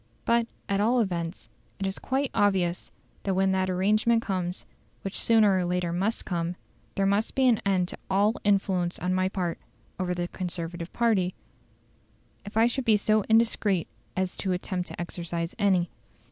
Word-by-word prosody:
"But, 235 Hz, 0 st, +3 dB, 0.2 s
at 200 Hz, 0 st, +1 dB
all 240 Hz, +4 st, +3 dB
events, 175 Hz, -5 st, -2 dB, 0.3 s
it 195 Hz, -, -3 dB
is 190 Hz, 0 st, -2 dB
quite 270 Hz, +1 st, -1 dB
obvious 185 Hz, -4 st, +1 dB, 0.3 s
that 195 Hz, -2 st, -1 dB
when 190 Hz, 0 st, +3 dB
that 190 Hz, 0 st, +1 dB
arrangement 215 Hz, +5 st, +2 dB
comes, 180 Hz, -2 st, -3 dB, 0.4 s
which 195 Hz, -, -4 dB
sooner 220 Hz, -4 st, +4 dB
or 185 Hz, -, +1 dB
later 175 Hz, -1 st, -1 dB
must 200 Hz, +6 st, -1 dB
come, 170 Hz, -1 st, -2 dB, 0.4 s
there 195 Hz, -, +1 dB
will 200 Hz, +2 st, +3 dB
be 265 Hz, -1 st, +4 dB
an 235 Hz, -4 st, +4 dB
end 185 Hz, -2 st, +2 dB
to -, -, -7 dB
all 200 Hz, +3 st, +3 dB
influence 190 Hz, -3 st, +1 dB
on 180 Hz, +1 st, -1 dB
my 185 Hz, 0 st, +1 dB
part 180 Hz, -3 st, -2 dB, 0.4 s
over 180 Hz, -1 st, -1 dB
the 175 Hz, 0 st, -2 dB
Conservative 175 Hz, -1 st, -5 dB
party, 205 Hz, -6 st, +1 dB, 1.1 s
if 205 Hz, +2 st, -6 dB
I 225 Hz, -, +6 dB
should 240 Hz, +3 st, 0 dB
be 220 Hz, -2 st, +5 dB
so 215 Hz, +1 st, +2 dB
indiscreet 220 Hz, -5 st, +3 dB, 0.3 s
as 185 Hz, -1 st, -1 dB
to 190 Hz, -2 st, -1 dB
attempt 180 Hz, 0 st, -3 dB
to -, -, -8 dB
exercise 170 Hz, -1 st, -4 dB
any. 185 Hz, -4 st, +2 dB
190 Hz, 170 wpm, -27 LUFS, 180-210 Hz, 1.1 s, I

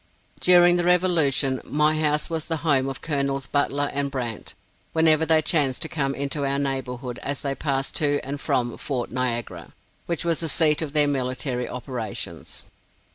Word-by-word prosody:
During 175 Hz, -1 st, +6 dB
the 175 Hz, -, 0 dB
revolution, 160 Hz, -7 st, +2 dB
my 150 Hz, +1 st, +2 dB
house 150 Hz, -1 st, +1 dB
was 160 Hz, -2 st, -4 dB
the 165 Hz, -, -2 dB
home 135 Hz, -3 st, +2 dB
of 135 Hz, -, -7 dB
Col's 140 Hz, -3 st, -1 dB
Butler 145 Hz, 0 st, 0 dB
and 140 Hz, 0 st, -1 dB
Brandt, 120 Hz, -5 st, -5 dB, 0.4 s
whenever 160 Hz, -1 st, +4 dB
they 160 Hz, 0 st, +4 dB
chanced 150 Hz, -2 st, +1 dB
to -, -, -2 dB
come 140 Hz, -5 st, -1 dB
into 140 Hz, +1 st, -2 dB
our 140 Hz, 0 st, 0 dB
neighborhood 130 Hz, -3 st, -3 dB
as 140 Hz, -1 st, -3 dB
they 140 Hz, -1 st, -1 dB
passed 135 Hz, -1 st, -2 dB
to 145 Hz, -1 st, +2 dB
and 140 Hz, +1 st, -5 dB
from 120 Hz, -2 st, -1 dB
Fort 130 Hz, -4 st, -3 dB
Niagara, 120 Hz, -8 st, -3 dB, 0.3 s
which 170 Hz, -1 st, -2 dB
was 165 Hz, -2 st, 0 dB
the 165 Hz, -, -3 dB
seat 150 Hz, +1 st, +4 dB
of 150 Hz, -3 st, -4 dB
their 150 Hz, -1 st, +4 dB
military 130 Hz, -2 st, -2 dB
operations. 125 Hz, -4 st, -5 dB
140 Hz, 170 wpm, -24 LUFS, 130-155 Hz, 0.4 s, During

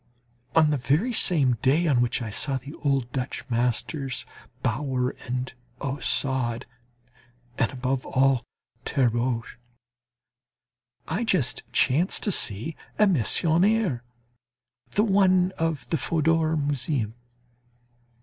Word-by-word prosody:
On 155 Hz, -2 st, +5 dB
the 145 Hz, -, +1 dB
very 150 Hz, -, +1 dB
same 135 Hz, -, +2 dB
day 145 Hz, +6 st, +3 dB
on 135 Hz, -7 st, +3 dB
which 120 Hz, 0 st, 0 dB
I 110 Hz, -, -5 dB
saw 135 Hz, +6 st, 0 dB
the 135 Hz, +3 st, -9 dB
old 135 Hz, -4 st, 0 dB
Dutch 130 Hz, 0 st, -4 dB
masters, 125 Hz, +3 st, -1 dB, 0.4 s
Brouwer, 130 Hz, +1 st, -1 dB, 0.6 s
Ostade, 130 Hz, -3 st, 0 dB, 1.0 s
and 115 Hz, -, +2 dB
above 130 Hz, 0 st, -2 dB
all 130 Hz, -1 st, +2 dB, 0.4 s
Terborch, 120 Hz, -3 st, 0 dB, 1.5 s
I 185 Hz, +9 st, -1 dB
just 145 Hz, -, 0 dB
chanced 155 Hz, +9 st, +2 dB
to 205 Hz, -, +1 dB
see 115 Hz, -, +1 dB, 0.2 s
a 210 Hz, -, +5 dB
Meissonier 175 Hz, -, +3 dB, 0.9 s
the 210 Hz, -, +1 dB
one 190 Hz, -3 st, +3 dB
of 160 Hz, -5 st, -1 dB
the 165 Hz, -, +2 dB
Fodor 160 Hz, 0 st, +1 dB
Museum. 140 Hz, -5 st, -1 dB
135 Hz, 105 wpm, -25 LUFS, 125-165 Hz, 1.5 s, On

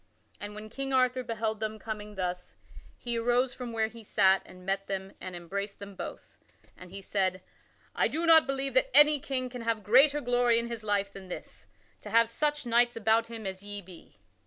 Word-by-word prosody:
And 205 Hz, 0 st, -7 dB
when 215 Hz, +1 st, -8 dB
King 270 Hz, +2 st, -4 dB
Arthur 255 Hz, 0 st, +2 dB
beheld 225 Hz, -2 st, -3 dB
them 220 Hz, 0 st, -3 dB
coming 210 Hz, -1 st, -7 dB
thus, 180 Hz, -1 st, -4 dB, 0.4 s
he 235 Hz, -1 st, -2 dB
arose 245 Hz, +2 st, +1 dB
from 245 Hz, -2 st, -6 dB
where 225 Hz, -1 st, +1 dB
he 225 Hz, +1 st, -9 dB
sat 195 Hz, -2 st, +3 dB
and 180 Hz, 0 st, -14 dB
met 195 Hz, +1 st, -2 dB
them 195 Hz, 0 st, -4 dB
and 185 Hz, 0 st, -6 dB
embraced 200 Hz, +4 st, -5 dB
them 200 Hz, 0 st, -9 dB
both, -, -, -9 dB, 0.4 s
and 180 Hz, -, -13 dB
he 195 Hz, +2 st, -9 dB
said: 185 Hz, -2 st, -1 dB, 0.5 s
"I -, -, +2 dB
do 330 Hz, +2 st, -2 dB
not 325 Hz, -2 st, +7 dB
believe 275 Hz, 0 st, -1 dB
that -, -, +3 dB
any 295 Hz, 0 st, +7 dB
king 265 Hz, -3 st, -2 dB
can 250 Hz, -1 st, -8 dB
have 230 Hz, -2 st, -1 dB
greater 275 Hz, +8 st, +5 dB
glory 245 Hz, -3 st, +2 dB
in 235 Hz, 0 st, -1 dB
his 230 Hz, -2 st, -6 dB
life 200 Hz, -1 st, -1 dB
than 195 Hz, -1 st, -10 dB
this, 180 Hz, -, -9 dB, 0.3 s
to -, -, -9 dB
have 230 Hz, 0 st, +4 dB
such 295 Hz, +3 st, -1 dB
knights 240 Hz, +1 st, +3 dB
about 225 Hz, +1 st, +2 dB
him 225 Hz, -2 st, -8 dB
as 190 Hz, 0 st, -5 dB
ye 205 Hz, 0 st, -6 dB
be." 180 Hz, -3 st, -14 dB
225 Hz, 205 wpm, -29 LUFS, 200-245 Hz, 0.5 s, not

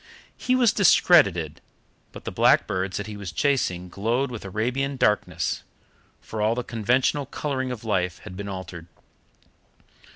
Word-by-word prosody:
He 255 Hz, -, 0 dB
was 245 Hz, -4 st, +4 dB
discredited, 100 Hz, -, +4 dB, 0.5 s
but -, -, -11 dB
the -, -, -5 dB
blackbirds 95 Hz, +1 st, +2 dB
that 105 Hz, -, -4 dB
he 105 Hz, 0 st, -7 dB
was 100 Hz, -4 st, -6 dB
chasing 90 Hz, -, 0 dB
glowed 115 Hz, +8 st, -1 dB
with 115 Hz, -, -7 dB
Arabian 125 Hz, +8 st, -2 dB
darkness, 90 Hz, -8 st, 0 dB, 0.6 s
for 110 Hz, -, -6 dB
all 110 Hz, +2 st, +2 dB
the 125 Hz, -, -2 dB
conventional 125 Hz, +5 st, 0 dB
colouring 135 Hz, -2 st, -3 dB
of 125 Hz, -3 st, -6 dB
life 90 Hz, -5 st, -1 dB
had 90 Hz, -, -9 dB
been 100 Hz, +1 st, -6 dB
altered. 95 Hz, -3 st, -7 dB
110 Hz, 140 wpm, -24 LUFS, 95-130 Hz, 0.6 s, was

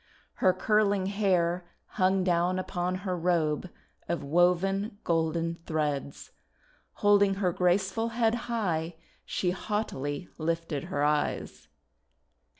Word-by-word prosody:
Her 185 Hz, -, +6 dB
curling 205 Hz, 0 st, +2 dB
hair 185 Hz, -3 st, +1 dB, 0.2 s
hung 190 Hz, -1 st, +1 dB
down 180 Hz, 0 st, +2 dB
upon 180 Hz, -1 st, -2 dB
her 185 Hz, -2 st, 0 dB
robe 170 Hz, -1 st, 0 dB, 0.4 s
of 170 Hz, -3 st, -1 dB
woven 180 Hz, +6 st, +2 dB
golden 165 Hz, 0 st, 0 dB
threads. 150 Hz, -3 st, -2 dB, 0.7 s
Holding 200 Hz, -1 st, +5 dB
her 185 Hz, -3 st, 0 dB
graceful 190 Hz, +5 st, +1 dB
head 230 Hz, -1 st, +1 dB, 0.2 s
high 175 Hz, -8 st, -1 dB, 0.3 s
she 180 Hz, -, -1 dB
haughtily 180 Hz, -7 st, -3 dB
lifted 165 Hz, -3 st, -2 dB
her 145 Hz, -, -2 dB
eyes. 150 Hz, 0 st, -1 dB
180 Hz, 105 wpm, -28 LUFS, 165-195 Hz, 0.7 s, Her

